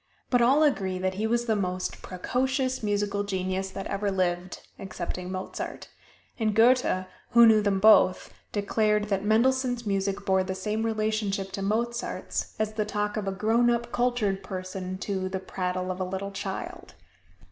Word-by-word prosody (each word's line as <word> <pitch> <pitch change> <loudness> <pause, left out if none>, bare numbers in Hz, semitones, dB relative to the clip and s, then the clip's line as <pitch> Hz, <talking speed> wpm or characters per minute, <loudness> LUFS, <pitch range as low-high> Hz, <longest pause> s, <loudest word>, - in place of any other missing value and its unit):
But 245 -2 +4
all 270 +6 +5
agree 195 -11 +1
that 185 +1 -1
he 210 +4 -1
was 235 +1 +1
the 225 -2 +1
most 185 -2 -2
precocious 260 +7 -1
musical 205 -1 0
genius 190 -1 -2
that 195 0 -6
ever 200 +1 -1
lived, 180 -1 -2
excepting 185 -1 -5
Mozart; 185 0 -5 0.5
and 215 -2 +1
Goethe, 230 -5 +4 0.3
who 235 0 +8
knew 220 -1 +6
them 200 -2 +1
both, 210 -3 +5 0.2
declared 210 0 +1
that 195 -1 0
Mendelssohn's 245 +2 +2
music 200 0 -1
bore 190 -1 +3
the 190 0 -4
same 210 +4 -2
relationship 215 -3 -1
to 195 - -4
Mozart's 235 +4 -2
as 215 0 -1
the 215 0 0
talk 210 0 -2
of 210 -2 -3
a - - +1
grown 225 +5 +2
up 235 0 0
cultured 240 -6 0
person 185 -1 -5
to 190 -1 -3
the 190 0 -3
prattle 185 0 -3
of 185 +1 -5
a 190 +2 -3
child. 195 - -6
205 Hz, 160 wpm, -27 LUFS, 190-225 Hz, 0.5 s, who